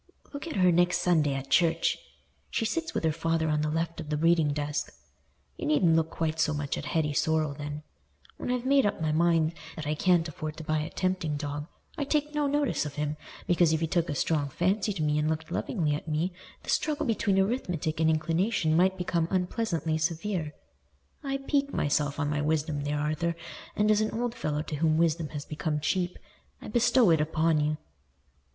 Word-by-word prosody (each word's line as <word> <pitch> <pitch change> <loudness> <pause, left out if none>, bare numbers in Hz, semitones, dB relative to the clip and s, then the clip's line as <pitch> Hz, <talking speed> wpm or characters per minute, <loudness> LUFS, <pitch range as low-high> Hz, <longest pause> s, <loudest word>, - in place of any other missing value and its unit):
"Look 285 +3 -6
at 325 - -5
her 185 -2 +5
next 175 +1 +3
Sunday 155 -6 +3
at 135 0 -6
church—she 165 +6 0
sits 330 +9 -2
with - - -1
her 160 - +3
father 165 0 0
on 150 0 +1
the 155 - 0
left 165 +1 -2
of 155 - -9
the 150 - 0
reading 165 -1 +3
desk. 145 0 -2 0.7
You - - -3
needn't 160 +2 +4
look 160 0 +2
quite 160 -1 -2
so 155 -2 +2
much 145 -1 -2
at - - -5
Hetty 155 -3 0
Sorrel 155 0 +1
then. 145 +1 -6 0.5
When - - -5
I've 250 0 -1
made 275 +1 +4
up 205 -1 0
my 155 -1 0
mind 165 0 +3 0.2
that 155 - -6
I 150 - 0
can't 175 +1 +3
afford 155 0 -6
to 160 - -6
buy 155 0 0
a 155 +2 -3
tempting 185 -6 -1
dog, 145 +1 -4 0.3
I 285 - 0
take 300 +1 0
no 295 -1 +1
notice 290 -1 +1
of 145 -2 -6
him, 150 0 -2 0.3
because 175 -2 +3
if 160 - +1
he 165 - +1
took 165 +1 0
a 145 - -1
strong 145 0 0
fancy 190 +8 0
to 180 -6 -2
me 150 0 +2
and 150 +1 +1
looked 160 0 -3
lovingly 155 -8 0
at 150 - -4
me, 160 +4 -1 0.3
the - - -3
struggle 305 0 0
between 205 -5 +1
arithmetic 180 - 0
and 160 0 +4
inclination 165 +2 +1
might 190 +3 +3
become 170 -2 0
unpleasantly 180 -4 -1
severe. 165 0 -2 0.7
I 275 -1 -1
pique 280 +1 0
myself 145 0 0
on 145 - 0
my 145 0 0
wisdom 150 -1 0
there, 145 +1 -1
Arthur, 155 +3 -1 0.4
and 210 +1 +3
as 210 0 +3
an 215 - +1
old 240 -1 -1
fellow 150 -6 -2
to 150 - -5
whom 155 +1 +2
wisdom 165 -1 +2
had 145 -1 -6
become 150 0 -2
cheap, 180 +3 -1 0.4
I - - -9
bestow 240 -2 +4
it 160 -2 +4
upon 160 +1 +2
you." 150 +1 0
160 Hz, 205 wpm, -28 LUFS, 150-185 Hz, 0.7 s, her